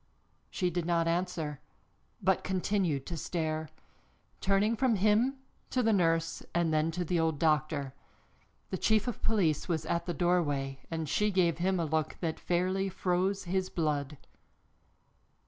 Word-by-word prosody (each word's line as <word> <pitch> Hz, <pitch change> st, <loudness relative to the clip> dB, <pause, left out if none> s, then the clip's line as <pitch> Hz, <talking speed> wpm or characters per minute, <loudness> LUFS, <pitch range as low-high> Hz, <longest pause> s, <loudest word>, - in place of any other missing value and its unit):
She 180 Hz, -2 st, -1 dB
did 175 Hz, 0 st, -2 dB
not 170 Hz, -1 st, +2 dB
answer, 165 Hz, -4 st, -1 dB, 0.6 s
but 190 Hz, 0 st, +2 dB
continued 185 Hz, -6 st, 0 dB
to 170 Hz, -, -5 dB
stare, 160 Hz, -1 st, -2 dB, 0.7 s
turning 200 Hz, +3 st, +2 dB
from 250 Hz, -1 st, +2 dB
him 215 Hz, +7 st, +3 dB, 0.3 s
to 255 Hz, -, +1 dB
the 225 Hz, -1 st, +3 dB
nurse 165 Hz, -3 st, +1 dB
and 170 Hz, -2 st, +2 dB
then 155 Hz, +1 st, +2 dB
to 175 Hz, +2 st, -2 dB
the 175 Hz, +1 st, 0 dB
old 160 Hz, -2 st, +1 dB
doctor. 150 Hz, -3 st, +1 dB, 0.8 s
The 185 Hz, -, -2 dB
chief 220 Hz, +1 st, +2 dB
of 245 Hz, -, -3 dB
police 185 Hz, -9 st, +1 dB
was 160 Hz, -3 st, -1 dB
at 170 Hz, +2 st, -1 dB
the 175 Hz, -, -2 dB
doorway 145 Hz, -7 st, +1 dB
and 160 Hz, -1 st, -3 dB
she 210 Hz, +9 st, +2 dB
gave 175 Hz, -4 st, +2 dB
him 185 Hz, +1 st, +1 dB
a 165 Hz, -, +1 dB
look 155 Hz, 0 st, -1 dB
that 165 Hz, -3 st, -2 dB
fairly 185 Hz, +2 st, 0 dB
froze 190 Hz, +2 st, 0 dB
his 185 Hz, +1 st, -1 dB
blood. 150 Hz, -3 st, -1 dB
175 Hz, 150 wpm, -31 LUFS, 160-190 Hz, 0.8 s, him